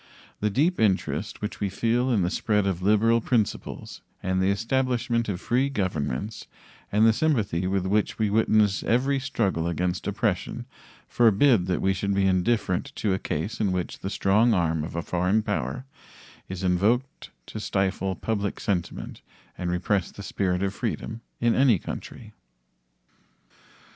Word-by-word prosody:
The 105 - +1
deep 155 - +1
interest 100 -4 0
which 105 - -4
we 100 - -1
feel 120 +6 +1
in 110 -7 +2
the 90 - 0
spread 105 -2 +1
of 95 -2 -1
liberal 110 +4 +3
principles 110 -3 -2 0.2
and 95 0 0
the 95 - +2
establishment 120 +1 0
of 90 -3 -2
free 130 +7 +1
governments 95 - -3 0.4
and 105 +2 +4
the 115 - +6
sympathy 110 - 0
with 95 -1 0
which 105 +2 0
we 110 -2 +1
witness 110 -2 +3
every 135 +4 +1
struggle 100 -11 -1
against 90 +1 -2
oppression - - -1 0.4
forbid 115 -3 +4
that 90 - 0
we 95 - +3
should 100 +1 -1
be 100 0 +2
indifferent 95 0 +1
to 105 -3 0
a 95 - -1
case 80 +6 -3
in 100 -3 +2
which 90 -2 -3
the 95 - -4
strong 105 +4 +3
arm 80 -3 +1
of 80 - -6
a 85 - -2
foreign 90 +6 +1
power 115 +5 -3 0.6
is 95 0 -5
invoked 105 +9 +1 0.2
to 110 - -7
stifle 95 -2 -1
public 100 0 -2
sentiment 90 -5 -3 0.3
and 90 - -3
repress 90 +2 0
the 100 - -10
spirit 95 -2 -1
of 100 0 -1
freedom 115 0 -4 0.2
in 120 -1 +3
any 130 -5 +4
country. 110 +5 -8
100 Hz, 155 wpm, -26 LUFS, 95-115 Hz, 0.6 s, the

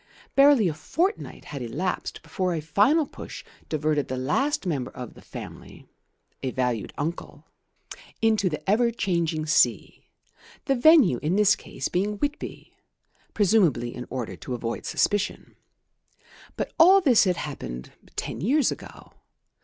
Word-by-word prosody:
Barely 275 -7 +6
a 165 - -1
fortnight 340 - -2
had 140 -3 -7
elapsed 180 +10 -3
before 185 -2 -2
a - - -2
final 205 - +3
push - - -10 0.2
diverted 155 -2 0
the 130 - -3
last 270 - 0
member 145 -8 -2
of 125 -3 -9
the - - -15
family - - -10 0.6
(a 130 - -2
valued 125 -4 -2
uncle) 160 +4 -5 0.7
into 215 -4 +2
the 150 +2 -6
ever 230 +4 +3
changing 170 -8 -1
sea, 155 - +1 0.6
the 275 - +2
venue 260 - +5
in 155 +5 0
this 205 0 +5
case - - -5
being 200 +4 -1
Whitby, 290 +6 -5 0.6
presumably 175 - +2
in 125 -1 -7
order 125 -3 -4
to 125 - -5
avoid 115 -1 -4
suspicion. 205 -1 -1 1.0
But - - -3
all 370 +4 +8
this 260 - +4
had 180 -2 +1
happened 65 - -6 0.2
ten - - -4
years 265 - +2
ago. - - -10
180 Hz, 140 wpm, -25 LUFS, 145-235 Hz, 1.0 s, all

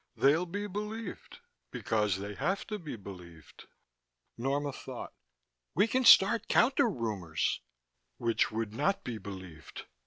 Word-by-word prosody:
They'll 155 +6 +3
be 205 +4 -3
believed 210 +1 -6 0.3
because 105 - 0
they 100 +1 -5
have 195 - -1
to 210 -2 -4
be 155 -8 -6
believed." 90 -6 -12 0.7
Norma 140 +3 -1
thought. 130 -2 -8 0.6
"We 195 +7 +5
can 255 +3 +1
start 220 +2 +7
counter 265 +1 +4
rumors." 100 - -2 0.6
"Which 115 -1 +1
would 110 -1 -3
not 195 - 0
be 115 -3 -5
believed. 95 -6 -9
130 Hz, 125 wpm, -31 LUFS, -, 0.7 s, start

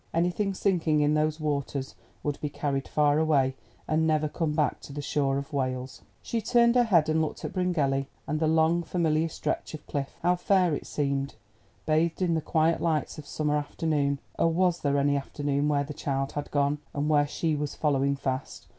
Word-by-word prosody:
Anything 180 +4 +1
sinking 165 -6 +2
in 150 +1 +3
those 155 +1 +1
waters 140 -3 -2 0.3
would 145 -1 -2
be 150 - -2
carried 140 -2 -2
far 150 0 +3
away, 140 -4 +2 0.3
and 160 +1 +2
never 155 -1 +2
come 155 0 -2
back 150 -2 +1
to - - -11
the 145 - -6
shore 140 -1 0
of 140 +1 -6
Wales. 130 -1 -3 0.2
She 230 - -2
turned 235 +1 +4
her 245 -1 +4
head 170 -8 +4
and 155 0 +2
looked 155 - -3
at - - -5
Bryngelly, 150 -7 0 0.2
and 155 +1 -2
the 160 - +2
long 160 +2 +3
familiar 165 -2 0
stretch 155 - -3
of 150 - -11
cliff. 140 -1 -4
How 180 0 +3
fair 180 -2 +3
it 145 - -4
seemed, 140 -2 -1 0.5
bathed 160 +2 +1
in 180 -3 +1
the 160 - 0
quiet 160 +1 +1
lights 160 -2 -1
of 145 - -10
summer 150 -1 -1
afternoon. 145 -1 0 0.2
Oh! - - +4
was 175 +1 +2
there 140 -1 +1
any 140 0 +2
afternoon 140 +1 -1
where 145 -1 +2
the 150 +1 -7
child 135 -1 -2
had 145 0 -4
gone, 145 +1 +1 0.2
and 145 +1 0
where 145 -1 +3
she 155 +1 -1
was 145 -1 -3
following 140 -2 +1
fast? 135 -1 -4
150 Hz, 200 wpm, -27 LUFS, 140-165 Hz, 0.5 s, turned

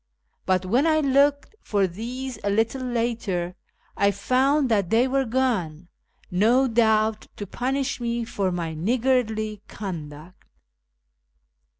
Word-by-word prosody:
But 185 0 +1
when 245 - +2
I 310 -1 +3
looked 285 +5 +2
for 200 -2 +1
these 245 +8 -6
a 200 - 0
little 225 +6 0
later, 230 -8 -2 0.4
I 200 - +3
found 260 +8 +2
that 200 -6 +1
they 235 +3 +3
were 270 +1 +1
gone, 205 -10 -1 0.4
no 230 +9 +3
doubt 220 -2 +2
to 205 - -6
punish 265 +5 -2
me 235 0 -2
for 195 -4 -2
my 170 -2 -3
niggardly 220 +2 0
conduct." 165 -3 -8
225 Hz, 120 wpm, -24 LUFS, 195-255 Hz, 0.4 s, I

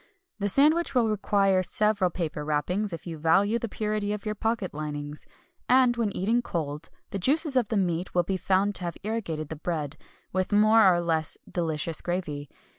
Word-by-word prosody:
The 205 0 +1
sandwich 305 - +3
will 240 -3 +4
require 200 -2 +2
several 205 0 +2
paper 160 -3 -4
wrappings, 180 +8 -1
if 165 - -7
you 165 -3 -6
value 195 +8 +3
the 230 - -4
purity 210 -1 -2
of 210 0 -6
your 215 - -1
pocket 220 -2 -2
linings. 150 0 -6 0.4
And 250 -1 +5
when 230 -3 0
eaten 225 +6 +1
cold, 155 -6 -4 0.2
the 200 - -3
juices 290 - +2
of 240 -5 +2
the 220 - 0
meat 180 -2 -1
will 175 - +4
be 190 +3 -2
found 190 +2 +1
to - - -6
have 170 - -4
irrigated 195 -9 -3
the 160 - -6
bread, 155 -2 -3 0.4
with 185 +1 -1
more 215 -1 +6
or 175 -1 +1
less 160 -2 -1
"delicious 160 -2 -2
gravy." 155 -6 -4
190 Hz, 185 wpm, -27 LUFS, 165-215 Hz, 0.4 s, more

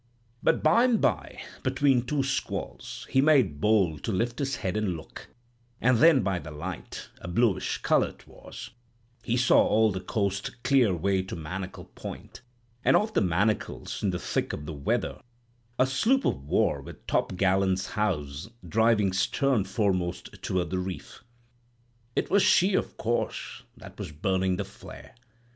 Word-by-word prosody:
"But - - +2
by'm 230 +9 +4
by, 85 - -1 0.2
between 130 -1 +2
two 140 +1 0
squalls, 135 0 -4
he 130 - +4
made 130 - +3
bold 95 -9 +2
to - - -1
lift 115 +6 -1
his 135 -2 -1
head 95 +1 -3
and 105 -5 -1
look, 80 - -11 0.5
and 125 -1 +3
then 155 -6 +6
by 95 -1 0
the 75 -1 -9
light—a 85 +3 -8
bluish 105 +3 +1
color - - +3
'twas—he 120 0 -8
saw 120 -1 +5
all 110 0 +3
the 95 - -3
coast 100 +3 -3
clear 135 -5 +4
away 95 +2 +1
to 95 - -7
Manacle 90 +4 -6
Point, - - -9 0.4
and - - +4
off 215 +1 -1
the - - +3
Manacles 95 +3 -1
in 100 - +1
the 90 - -1
thick - - -2
of 75 - -5
the 80 - -5
weather, 70 -2 -2 0.6
a 130 - +4
sloop 225 - +2
of 70 - -1
war - - +1
with - - -12
topgallants 95 0 +1
housed, 80 -5 -2 0.2
driving 105 0 +3
stern 115 +3 +1
foremost 95 -4 -2
toward 90 -1 -1
the 95 - 0
reef. 90 +3 -7 0.9
It - - -1
was 200 +1 +5
she, 190 +2 +4
of - - -1
course, 120 +1 -2 0.2
that - - -13
was - - -5
burning 95 +4 0
the - - -3
flare. - - -12
100 Hz, 155 wpm, -27 LUFS, 90-125 Hz, 0.9 s, then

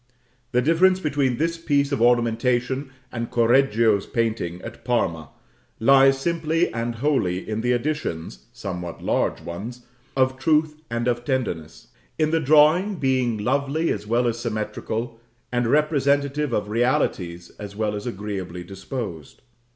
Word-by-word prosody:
The 125 -1 +2
difference 185 +5 +4
between 140 -7 0
this 165 +2 -1
piece 145 -3 +1
of 140 - -1
ornamentation 120 +3 +2 0.2
and 115 -1 -4
Correggio's 115 -4 +3
painting 110 -7 -1
at - - -9
Parma 85 - -1 0.5
lies 135 +3 +6
simply 165 +2 0
and 115 +1 -2
wholly 115 -9 0
in 110 0 -2
the 125 +1 +2
additions 115 - -3
(somewhat 90 -3 -6
large - - 0
ones), 115 +8 -7 0.3
of 130 0 +2
truth 155 +1 +1
and 120 +1 -2
of 120 -1 0
tenderness: 110 - -3 0.3
in 155 -1 +1
the 165 - +3
drawing 155 +7 +4
being 130 -6 +1
lovely 140 +8 0
as 105 - -4
well 120 +2 +2
as 115 0 -1
symmetrical 115 +1 -3 0.3
and 120 -1 +1
representative 145 0 +2
of 105 -3 -1
realities 105 - 0
as 100 -1 -8
well 105 0 -1
as 105 +3 -5
agreeably 95 -5 -5
disposed. 95 - -7
120 Hz, 135 wpm, -23 LUFS, 110-140 Hz, 0.5 s, lies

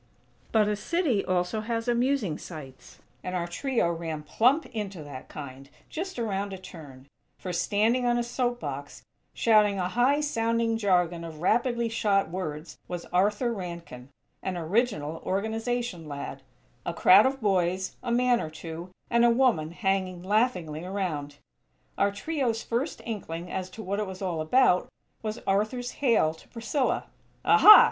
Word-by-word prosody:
_" - - -36 0.5
But 215 -2 +4
a 210 - +1
city 260 - 0
also 185 +4 0
has 230 +1 -3
amusing 240 - +1
sights; 135 - -10 0.3
and 180 0 -3
our 175 -1 -1
trio 200 +1 0
ran 165 -2 -4
plump 250 - +3
into 200 -7 -4
that 140 -3 -9
kind, 135 -1 -9 0.2
just 370 +1 -4
around 200 -4 -2
a - - -5
turn; 150 -8 -12 0.3
for, 180 - -5
standing 215 +8 +2
on 240 0 +3
a 240 - +1
soap 245 0 -1
box, 145 0 -6 0.3
shouting 210 -3 +4
a 180 -1 -1
high 250 +8 +3
sounding 230 -5 +1
jargon 180 -5 +1
of 160 -2 -8
rapidly 235 +3 +2
shot 205 -5 +1
words, 160 -3 -5
was 175 -1 -5
Arthur 205 +6 +2
Rankin, 170 - -7 0.3
an 185 -2 -3
original 165 -3 0
Organization 220 -2 -2
lad; 140 -1 -6 0.4
a - - -3
crowd - - +7
of 270 0 -2
boys, 185 -3 0
a 240 - -3
man 245 0 +3
or 155 - -4
two, 165 +3 -8 0.2
and 235 0 +4
a 240 - +6
woman 235 -11 +3
hanging 185 -1 -1
laughingly 185 -7 0
around. 175 -7 -3 0.6
Our 200 0 +2
trio's 235 +1 -1
first 250 +7 -2
inkling 180 -6 -5
as 185 -1 -3
to 220 +4 -9
what 200 +2 -2
it 210 - -1
was 190 +1 -7
all 170 -4 -1
about 180 +2 +3 0.3
was 215 0 -3
Arthur's 215 +5 0
hail 230 - +3
to 160 - -18
Priscilla: 250 +4 -1 0.4
"Aha! 425 0 +10
200 Hz, 155 wpm, -27 LUFS, 170-235 Hz, 0.6 s, Aha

